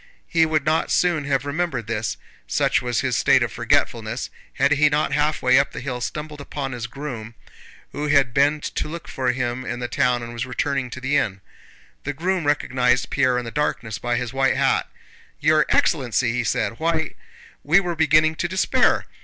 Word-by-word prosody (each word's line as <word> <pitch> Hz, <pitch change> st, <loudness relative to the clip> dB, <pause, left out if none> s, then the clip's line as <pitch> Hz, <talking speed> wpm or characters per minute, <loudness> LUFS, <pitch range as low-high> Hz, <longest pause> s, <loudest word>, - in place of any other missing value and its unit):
He 165 Hz, -2 st, +3 dB
would 155 Hz, -2 st, 0 dB
not 155 Hz, +1 st, +1 dB
soon 170 Hz, -5 st, +2 dB
have 140 Hz, -1 st, 0 dB
remembered 145 Hz, -5 st, -2 dB
this, 110 Hz, 0 st, -2 dB, 0.3 s
such -, -, +1 dB
was 120 Hz, -1 st, -1 dB
his 130 Hz, -3 st, 0 dB
state -, -, +4 dB
of -, -, -2 dB
forgetfulness, 115 Hz, +1 st, -1 dB, 0.2 s
had 140 Hz, +2 st, +2 dB
he 150 Hz, 0 st, +4 dB
not 150 Hz, -1 st, 0 dB
halfway 145 Hz, -3 st, +3 dB
up 140 Hz, -, 0 dB
the -, -, -5 dB
hill 125 Hz, -2 st, -4 dB
stumbled 150 Hz, +2 st, -5 dB
upon 140 Hz, -1 st, -5 dB
his 120 Hz, -2 st, -5 dB
groom, 120 Hz, -4 st, -7 dB, 0.6 s
who 145 Hz, +1 st, -3 dB
had 140 Hz, -5 st, +3 dB
been 145 Hz, +3 st, +3 dB
to -, -, -3 dB
look 170 Hz, +1 st, -7 dB
for 130 Hz, -2 st, -1 dB
him 125 Hz, 0 st, -3 dB
in 120 Hz, -1 st, -4 dB
the 120 Hz, -, -3 dB
town 125 Hz, -1 st, +1 dB
and 120 Hz, 0 st, -7 dB
was 120 Hz, +2 st, -4 dB
returning 130 Hz, 0 st, -1 dB
to 130 Hz, -, -7 dB
the 140 Hz, +2 st, +1 dB
inn. 100 Hz, -8 st, -1 dB, 0.6 s
The 145 Hz, -, -3 dB
groom 175 Hz, +2 st, -1 dB
recognized 125 Hz, -4 st, +1 dB
Pierre 130 Hz, -3 st, +2 dB
in 125 Hz, -, -3 dB
the 115 Hz, -, -6 dB
darkness 120 Hz, -7 st, -2 dB
by 120 Hz, 0 st, -1 dB
his 125 Hz, 0 st, -3 dB
white 135 Hz, 0 st, +2 dB
hat. -, -, +1 dB, 0.5 s
"Your 155 Hz, +1 st, +3 dB
excellency!" 125 Hz, -6 st, +2 dB
he 125 Hz, 0 st, 0 dB
said. 115 Hz, +1 st, -1 dB
"Why, 160 Hz, -1 st, 0 dB, 0.5 s
we 160 Hz, +7 st, +5 dB
were 175 Hz, -3 st, -3 dB
beginning 155 Hz, 0 st, +3 dB
to 175 Hz, -, -1 dB
despair! 185 Hz, +2 st, +2 dB
135 Hz, 190 wpm, -22 LUFS, 125-150 Hz, 0.6 s, we